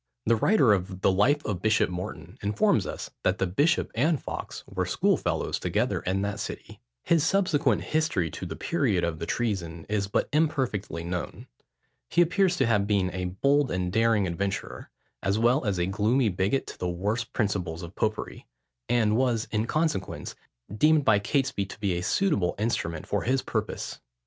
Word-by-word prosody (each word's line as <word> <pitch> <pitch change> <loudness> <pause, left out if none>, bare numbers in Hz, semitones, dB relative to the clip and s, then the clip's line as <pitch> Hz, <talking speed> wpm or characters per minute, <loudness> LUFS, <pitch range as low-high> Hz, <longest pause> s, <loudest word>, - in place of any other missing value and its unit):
The 115 - +4
writer 130 - +4
of 95 -1 -3
the - - +4
Life 135 +10 +2
of 95 -4 -2
Bishop 110 0 +3
Morton 90 -2 -6
informs 105 +1 +2
us - - -6
that 95 +8 +1
the 95 - +1
bishop 145 - +1
and 145 +5 +2
Fawkes - - -6
were - - -3
schoolfellows - - 0
together - - 0
in 95 +2 -1
that 100 0 -3
city. - - -7 0.2
His 165 -3 +3
subsequent 175 -4 +2
history 155 - 0
to 90 - -6
the 80 - -6
period 110 - 0
of 85 -1 -2
the - - -4
treason, 90 -9 -2
is 105 -1 -1
but 100 - 0
imperfectly 130 - 0
known. 90 +1 -5 0.6
He 175 - +5
appears 180 +1 +2
to 135 - +3
have 105 -3 +2
been 100 -3 +1
a 90 0 -3
bold 140 +10 +2
and 90 -1 -2
daring 115 -2 +3
adventurer, 95 +3 -3 0.3
as 95 +2 +1
well 120 +5 +3
as 100 -3 0
a 85 - +1
gloomy 105 +6 +2
bigot 95 +8 0
to - - -10
the 90 - -1
worst 105 +7 -2
principles 95 -6 -2
of 85 +2 -8
popery; 110 0 -3 0.4
and 110 -3 +3
was, 120 -3 +1
in 110 +1 0
consequence, 155 - -1 0.4
deemed 150 +4 +4
by 105 - +5
Catesby 130 -3 0
to 100 - -10
be 100 -4 0
a 85 - -2
suitable 100 - +1
instrument 90 -7 -2
for - - -1
his 130 +2 0
purpose. 110 -2 -3
105 Hz, 175 wpm, -27 LUFS, 95-130 Hz, 0.6 s, He